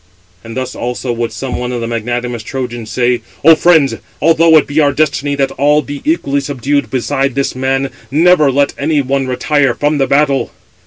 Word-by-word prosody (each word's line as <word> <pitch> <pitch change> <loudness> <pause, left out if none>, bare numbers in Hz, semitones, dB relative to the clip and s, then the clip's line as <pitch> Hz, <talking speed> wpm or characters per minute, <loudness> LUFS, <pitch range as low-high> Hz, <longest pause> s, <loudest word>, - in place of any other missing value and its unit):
And 115 +2 -8
thus 130 -1 -3
also 125 +1 -3
would 115 -1 -3
some 125 +4 -5
one 125 0 -3
of 125 - -3
the 115 - -3
magnanimous 120 +1 -3
Trojans 120 -4 -5
say: 120 +1 0 0.2
"Ο 165 - +9
friends, 160 -3 +3 0.2
although 165 +1 +5
it 155 - +3
be 145 +2 -1
our 145 -2 +3
destiny 145 -1 0
that 135 -1 0
all 150 +2 +3
be 145 0 -7
equally 140 - 0
subdued 140 -2 -2
beside 135 +2 -1
this 140 0 -1
man, 135 +1 -1 0.2
never 155 0 +4
let 140 +1 +1
any 150 +1 +1
one 135 0 -1
retire 135 0 +1
from 145 0 0
the 135 - +1
battle." 140 0 +1
135 Hz, 190 wpm, -14 LUFS, 125-145 Hz, 0.2 s, Ο